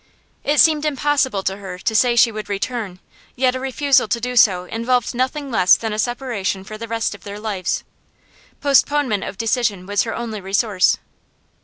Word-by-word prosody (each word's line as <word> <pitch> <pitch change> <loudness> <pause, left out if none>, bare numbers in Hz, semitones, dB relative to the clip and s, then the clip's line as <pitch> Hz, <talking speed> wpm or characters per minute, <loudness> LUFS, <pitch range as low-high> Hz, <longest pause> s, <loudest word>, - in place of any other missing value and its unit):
It 295 +1 +1
seemed 310 -2 +5
impossible 280 -7 0
to 195 +1 -2
her 190 -3 -8
to 220 +4 -2
say 240 +2 +4
she 235 0 +5
would 215 -1 -7
return, 205 -1 -3 0.4
yet 255 0 +2
a 260 - -3
refusal 270 +1 +2
to 235 - -1
do 250 +2 -4
so 190 -6 +5
involved 230 +5 -1
nothing 260 +3 -2
less 185 -5 +5
than 220 -2 -3
separation 235 -6 -2
for 215 +2 -9
the 230 +2 -7
rest 225 -1 -1
of 205 - -13
their 205 0 -7
lives. 200 -4 -2 0.8
Postponement 280 -5 +2
of 195 - -6
decision 225 -4 0
was 205 +1 +1
her 225 - -3
only 225 -3 -5
resource. 195 0 +2
230 Hz, 175 wpm, -20 LUFS, 200-255 Hz, 0.8 s, seemed